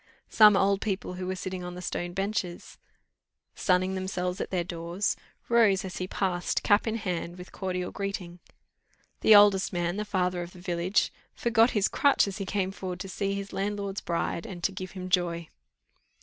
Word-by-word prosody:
Some 210 -2 +7
old 195 0 +2
people 195 -3 -2
who 180 0 -5
were 185 - -2
sitting 185 0 -5
on 180 0 -6
the - - -7
stone 175 0 -3
benches, 195 -2 -3 0.7
sunning 185 0 +1
themselves 185 -1 -2
at - - -3
their 180 -2 0
doors, 170 +3 -2 0.3
rose 220 -5 +4
as 185 - -6
he 185 - -3
passed, 185 -2 -1
cap 205 +2 +3
in 220 - 0
hand, 180 -5 -3
with 180 0 -10
cordial 180 -2 -3
greeting. 185 -3 -5 0.8
The 220 - +7
oldest 205 -2 +6
man, 175 0 -1
the 210 - -1
father 180 -3 0
of 175 0 -7
the 180 - -13
village, 175 +2 0 0.2
forgot 235 0 +4
his 200 - +3
crutch 280 -6 +3
as 200 +1 -5
he 195 - -4
came 190 -2 -1
forward 185 -2 -6
to 195 - -6
see 195 +1 -2
his 200 0 -6
landlord's 200 0 -2
bride, 170 0 -2
and 175 -3 -8
to - - +2
give 185 0 -7
him 185 -1 -6
joy. 170 -2 0
185 Hz, 185 wpm, -28 LUFS, 180-200 Hz, 0.8 s, Some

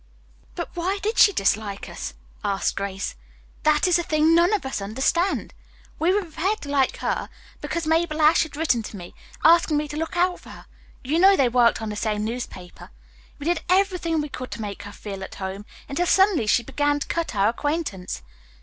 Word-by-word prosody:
"But - - -6
why 365 +3 -1
did 435 +2 0
she 410 - +8
dislike 200 - -1
us?" - - -6 0.3
asked 200 -2 0
Grace. 200 0 -3 0.5
"That 305 +3 +3
is 355 - +4
the - - 0
thing 310 0 +3
none 340 +3 +5
of 420 -9 0
us 265 -6 -3
understand. 265 - 0 0.5
We 335 +3 +3
were 405 +1 +1
prepared 355 +6 -2
to 285 - -7
like 275 -2 +1
her - - -1 0.3
because 335 -1 -3
Mabel 320 0 +1
Ashe 310 +1 +5
had 315 -3 -3
written 290 -7 +1
me, 175 -2 -10 0.3
asking 330 -1 +5
me 300 0 -1
to 295 - -5
look 325 +3 -3
out 360 +1 +2
for - - -15
her. - - -12 0.4
You 300 +6 0
know 390 +2 +7
they 260 -3 +3
worked 235 -2 +3
on 220 - -3
the 210 - -4
same 210 0 -1
newspaper. 220 -6 -7 0.5
We 285 - -8
did 345 0 +1
everything 365 -4 +2
we 300 - -5
could 255 -2 -7
to - - -6
make 200 -1 -6
her 205 - -9
feel 200 -2 -7
at - - -8
home, 195 +2 -6 0.2
until 350 +6 -1
suddenly 380 - +4
she 235 +3 +3
began 290 +3 0
to - - -3
cut 335 -8 -3
our 200 +1 +3
acquaintance. 240 - -3
295 Hz, 200 wpm, -24 LUFS, 215-340 Hz, 0.5 s, she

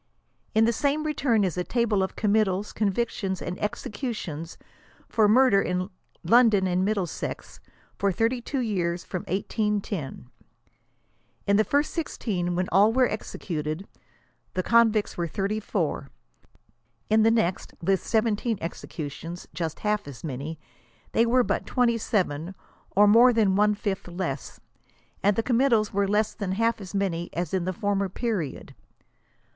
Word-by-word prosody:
In 220 +1 +5
the 235 - +2
same 290 +5 0
return 275 -8 +1
is 180 -2 -1
a - - 0
table 230 -2 +1
of 190 - -2
committals, 210 -2 +1
convictions 200 -2 -1
and 175 - -5
executions 205 - -4 0.5
for 220 -2 +3
murder 235 -2 +5
in 180 +1 -2 0.3
London 220 0 +5
and 180 0 +1
Middlesex, 195 -4 -3 0.4
for 200 0 +2
32 240 - -1
years 180 -6 -1
from 185 - -4
1810. 200 - -2 1.2
In 200 - +3
the 215 - +5
first 285 +6 +1
16, 185 - -2
when 180 +1 0
all 200 +4 +5
were 255 +1 +4
executed, 165 -4 -4 0.7
the 185 - 0
convicts 225 -2 +3
were 170 -1 -1
34. 195 -6 -2 1.0
In 220 0 +5
the 225 - +5
next, 220 -6 0
with 190 +2 +1
17 225 0 +1
executions 165 +1 -6
— - - -41
just 160 0 -4
half 210 -3 0
as 135 -5 -10
many 150 +2 -5 0.3
— 120 - -33
they 230 +1 +3
were 250 +2 +4
but - - -2
27| 205 - 0 0.4
or 205 +2 +7
more 235 +4 +7
than 215 -5 +3
one 210 +1 +3
fiAh 195 -4 -4
less; 145 -7 -4 0.6
and 205 0 +3
the 225 - 0
committals 235 -4 +2
were 200 0 +1
less 210 +2 +1
than 200 -4 -3
half 230 +2 +1
as 195 +1 -8
many 175 -4 -1
as 175 +2 -3
in 185 -2 0
the 185 - 0
former 200 0 -1
period. 190 - -3
200 Hz, 145 wpm, -26 LUFS, 180-225 Hz, 1.2 s, or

